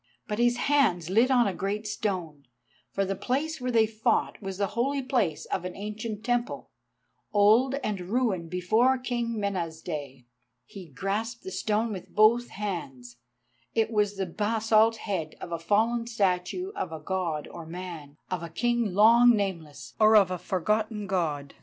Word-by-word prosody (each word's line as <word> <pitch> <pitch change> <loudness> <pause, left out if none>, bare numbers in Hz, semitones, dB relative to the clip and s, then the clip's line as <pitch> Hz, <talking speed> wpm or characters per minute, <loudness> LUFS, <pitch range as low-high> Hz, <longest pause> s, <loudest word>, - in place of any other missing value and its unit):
But 210 +1 -3
his 240 0 +3
hands 215 - +2
lit 230 +6 +4
on 250 -3 +4
a 200 - 0
great 205 +3 -3
stone, 180 - -3 0.4
for 195 - -1
the 195 +1 -2
place 275 +9 -2
where 250 - -2
they 230 -2 +4
fought 225 +2 0
was 195 -2 -5
the 200 - +1
holy 270 +4 0
place 225 - 0
of 180 - -3
an 180 0 -5
ancient 210 +1 -5
temple, 245 0 -2 0.6
old 220 +6 +4
and 205 -3 -2
ruined 190 -4 -1
before 220 +9 +2
King 240 -3 -2
Mena's 175 -6 -2
day. 140 -7 -6 0.4
He 190 -4 -11
grasped 205 - -3
the 380 - -6
stone 220 - 0
with 185 - -9
both 230 +3 +4
hands; 135 -12 -6 0.6
it 225 0 +1
was 210 -2 +1
the 195 - -1
basalt 220 +4 +2
head 185 -8 -4
of - - -8
a 170 - -2
fallen 225 +6 +1
statue 205 - -1
of 405 - -3
a 160 - -6
God 165 -2 -2
or 170 -1 -9
a - - -13
man, 165 -5 -8
of 180 -2 -2
a 170 - -6
king 235 +2 0
long 235 +3 +7
nameless, 175 -8 -4
or 215 0 +6
of 195 -3 +6
a 180 - -3
forgotten 210 +4 -1
God. 155 -7 -2
205 Hz, 170 wpm, -27 LUFS, 180-230 Hz, 0.6 s, long